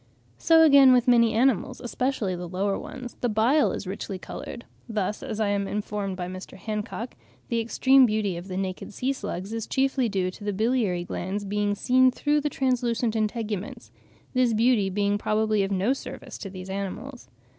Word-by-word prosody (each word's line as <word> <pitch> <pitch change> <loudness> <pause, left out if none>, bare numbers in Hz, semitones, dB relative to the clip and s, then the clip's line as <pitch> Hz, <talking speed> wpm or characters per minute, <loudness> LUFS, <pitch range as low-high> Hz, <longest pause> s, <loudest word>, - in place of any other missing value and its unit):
So 325 -1 +6
again 280 -4 +8
with 250 0 +3
many 235 -2 +5
animals, 260 +2 +1
especially 245 -6 -2
the 175 0 -6
lower 195 +2 0
ones, 250 -2 -8
the 245 - +1
bile 235 +8 +3
is - - -5
richly 190 +1 -5
coloured; 235 +5 -8 0.2
thus, 210 -2 -2
as 215 - -5
I 215 -2 +1
am 200 -1 0
informed 205 -2 -3
by 180 -1 -4
Mr. 185 +1 -8
Hancock, 215 +3 -5 0.4
the 235 - +1
extreme 260 +3 +4
beauty 210 -4 -1
of 175 +2 -7
the 185 - -5
Eolidae - - -1
(naked 185 +1 -5
sea 265 +2 0
slugs) 205 -4 -5
is 225 -1 -4
chiefly 265 -2 +1
due 185 -3 -1
to 205 - -12
the 205 0 -2
biliary 215 -4 0
glands 190 +3 -4
being 205 0 0
seen 255 +4 +4
through 295 +3 0
the 295 - -1
translucent 245 -4 0
integuments—this 220 +2 -3
beauty 225 -3 +3
being 205 +1 0
probably 215 0 +1
of 195 - 0
no 200 +6 +1
service 275 - -8
to 195 - -6
these 185 0 -8
animals. 200 +7 -6
215 Hz, 180 wpm, -26 LUFS, 195-250 Hz, 0.4 s, again